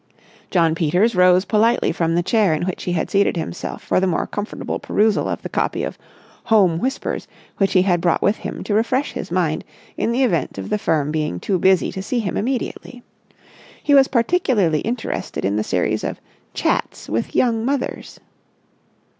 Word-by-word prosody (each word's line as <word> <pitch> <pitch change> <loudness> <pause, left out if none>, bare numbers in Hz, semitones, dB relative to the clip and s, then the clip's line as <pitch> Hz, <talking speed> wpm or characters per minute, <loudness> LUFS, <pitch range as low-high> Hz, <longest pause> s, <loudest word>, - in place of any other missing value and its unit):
Jno. 165 -3 +3
Peters 180 +8 +2
rose 180 +1 +5
politely 225 +4 +2
from 165 -1 0
the 175 - +1
chair 200 -4 +2
in 155 - -3
which 185 - -4
he 180 - -1
had 175 - -2
seated 200 -2 +2
himself 165 +2 -5
for - - +1
the 190 - +1
more 175 - 0
comfortable 205 +1 -4
perusal 215 0 +1
of - - -4
the - - -3
copy - - -1
of - - -4 0.5
Home 190 -7 +4
Whispers 265 +7 -3 0.3
which 195 -1 +1
he 185 - +5
had 175 -3 +1
brought 170 -2 +1
with 205 +2 +2
him - - -6
to 210 - -2
refresh 255 +6 +1
his - - -6
mind - - 0 0.3
in - - 0
the 255 +3 +2
event 170 - 0
of 95 - -5
the 210 - +1
firm 150 -6 0
being 150 - -2
too 185 - -1
busy 190 +1 +3
to 190 - -5
see 245 +6 -2
him 210 -6 -2
immediately. 245 +1 -3 0.8
He 290 - +2
was 270 -1 +7
particularly 230 - +2
interested 230 - -3
in 100 +1 0
the 105 - 0
series - - -1
of - - -4 0.4
chats - - -1
with 115 +2 -3
Young 230 -3 +2
Mothers. 270 +1 -3
195 Hz, 185 wpm, -20 LUFS, 170-230 Hz, 0.8 s, was